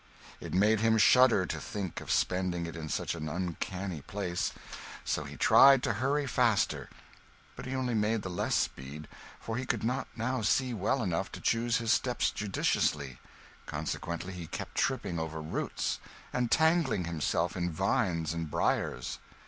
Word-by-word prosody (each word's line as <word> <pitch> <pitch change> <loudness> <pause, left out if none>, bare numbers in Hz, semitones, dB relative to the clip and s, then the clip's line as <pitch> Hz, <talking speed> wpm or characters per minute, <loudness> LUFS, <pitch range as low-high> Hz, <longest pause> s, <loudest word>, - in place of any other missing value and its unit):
It - - -7
made 105 +3 +4
him 110 0 +3
shudder 120 -3 +6
to 80 - -4
think 95 -1 -5
of - - -10
spending 90 -2 +1
it 85 - -7
in 80 -2 -6
such - - -1
an 80 -2 -4
uncanny 90 0 -3
place; 95 -2 -2 0.5
so - - -1
he - - -9
tried 135 -1 +7
to 110 - +1
hurry 140 +2 +1
faster, 120 -4 +1 0.7
but - - -8
he 135 - -3
only 130 -2 -1
made 110 0 +1
the 95 - -4
less 85 - 0
speed, 70 +4 -3 0.3
for 110 0 -4
he 130 - -3
could 120 -5 -1
not 125 +4 -1
now 120 +2 -1
see 125 +4 +2
well 115 +5 0
enough 90 -4 -1
to - - -6
choose 115 0 +1
his 115 -1 +2
steps 125 -2 +1
judiciously; 75 -9 0 0.5
consequently 85 +2 -4
he 85 -3 -7
kept - - -6
tripping 85 - 0
over 80 0 -4
roots 80 +1 -2 0.3
and 125 -1 0
tangling 160 - +3
himself 85 +1 -1
in 90 -1 -1
vines 90 - 0
and 85 -1 -4
briers. - - -1
100 Hz, 165 wpm, -30 LUFS, 85-120 Hz, 0.7 s, tried